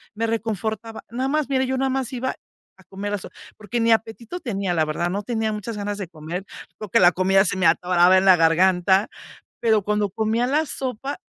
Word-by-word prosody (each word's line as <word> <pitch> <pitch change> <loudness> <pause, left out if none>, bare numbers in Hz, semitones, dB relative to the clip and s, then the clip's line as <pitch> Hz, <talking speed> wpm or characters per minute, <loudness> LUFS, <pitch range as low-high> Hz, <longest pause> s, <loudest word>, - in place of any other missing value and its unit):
me 225 +2 -1
reconfortaba. 220 0 -3
Nada 255 +3 -2
más, 300 0 0
mira, 265 -1 +1
yo 260 0 -2
nada 265 +1 0
más 265 -2 -2
iba 260 +1 -3 0.4
a - - -19
comer 200 +1 -6
la - - 0
so - - -10 0.3
porque 215 +3 -4
ni 230 0 +3
apetito 225 +7 -1
tenía, 200 - -2
la 160 -2 +2
verdad, 165 +3 -2
no 200 +3 -2
tenía 220 0 -1
muchas 210 +2 -5
ganas 205 0 -3
de 195 -3 -5
comer, 170 +3 -6 0.3
porque 210 -3 0
la 175 0 +7
comida 190 +1 +3
se 185 - 0
me 190 - +3
atoraba 180 0 +4
en 185 - +2
la 190 -1 +8
garganta, 180 +4 +3 0.5
pero 220 -3 +3
cuando 210 0 0
comía 220 +4 0
la 305 +4 +1
sopa, 270 +1 -4
210 Hz, 205 wpm, -22 LUFS, 185-235 Hz, 0.5 s, la